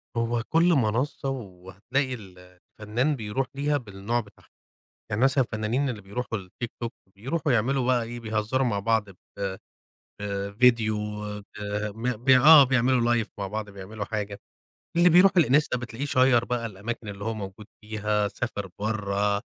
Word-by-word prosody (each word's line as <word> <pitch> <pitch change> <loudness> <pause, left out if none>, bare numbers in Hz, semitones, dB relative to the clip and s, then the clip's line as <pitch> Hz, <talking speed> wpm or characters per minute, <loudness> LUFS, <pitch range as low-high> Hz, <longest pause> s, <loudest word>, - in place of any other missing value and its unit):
هو 115 0 0
كُلّ 170 +2 +4
منصّة 130 +2 0
وهتلاقي 110 +3 -3
ال 90 -5 -12 0.2
الفنان 120 +8 0
بيرُوح 115 +2 -2
ليها 145 +1 +1
بالنوع 110 -1 -3
بتاعها، 105 -3 -12 0.6
يعني 110 +2 -1
مثلًا 135 0 +4
الفنانين 115 +5 -1
اللي 110 -5 -5
بيروحوا 110 +3 -4
للTikTok 115 +5 -6 0.3
بيروحوا 135 +8 -1
يعملوا 125 +3 +1
بقى 125 -2 +3
إيه، 120 +1 -7
بيهزروا 110 +4 0
مع 105 -4 0
بعض 105 0 +1
ب 95 - -16 1.0
ب 100 -1 -3
فيديو 115 -3 +4 1.0
ب 115 +3 -3 0.2
ب 135 - +3
آه 140 +3 +9
بيعملوا 125 -2 +2
Live - - -22
مع 100 - -2
بعض 105 +1 -5
بيعملوا 100 +2 -7
حاجة، 105 -1 -4 0.6
اللي 175 +1 +6
بيرُوحوا 180 +2 +6
الإنستا 140 -2 +2
بتلاقيه 120 +3 -5
شيّر 130 -4 +4
بقى 120 -1 -2
الأماكن 110 +2 -6
اللي 100 0 -6
هو 110 +1 -1
موجود 100 0 -8
فيها 105 -1 -1
سافر 100 -1 -4
برّه، 105 -2 -2 0.2
آآ - - -3
115 Hz, 150 wpm, -26 LUFS, 105-130 Hz, 1.0 s, آه